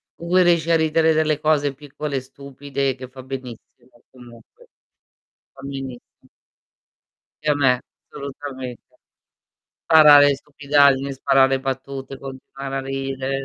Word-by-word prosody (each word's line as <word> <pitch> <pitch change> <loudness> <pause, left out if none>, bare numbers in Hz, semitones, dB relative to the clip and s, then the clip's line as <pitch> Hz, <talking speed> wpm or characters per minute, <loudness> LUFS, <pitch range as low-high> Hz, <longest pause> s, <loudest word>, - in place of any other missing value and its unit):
con 170 - -10
cui 185 +1 +4
riesci 170 -2 +2
a - - +5
ridere 160 0 +2
delle 155 -1 +1
cose 145 -2 +1
piccole 145 0 -6
e - - -3
stupide 140 0 -4
che 130 -1 -9
fa 130 0 -12
benissimo 125 -2 -10
comunque, 120 -3 -17 0.9
fa - - -15
benissimo. 135 -2 -6 1.4
E 155 - 0
a - - +1
me 130 -3 +2 0.3
assolutamente. 135 -3 -8 1.1
Sparare 150 -3 +8
le 140 - +3
stupidaggini, 140 -1 +2
sparare 135 0 +2
battute, 135 0 -5
continuare 135 0 -8
a - - -1
ridere, 135 0 -4
135 Hz, 125 wpm, -21 LUFS, 130-145 Hz, 1.4 s, Sparare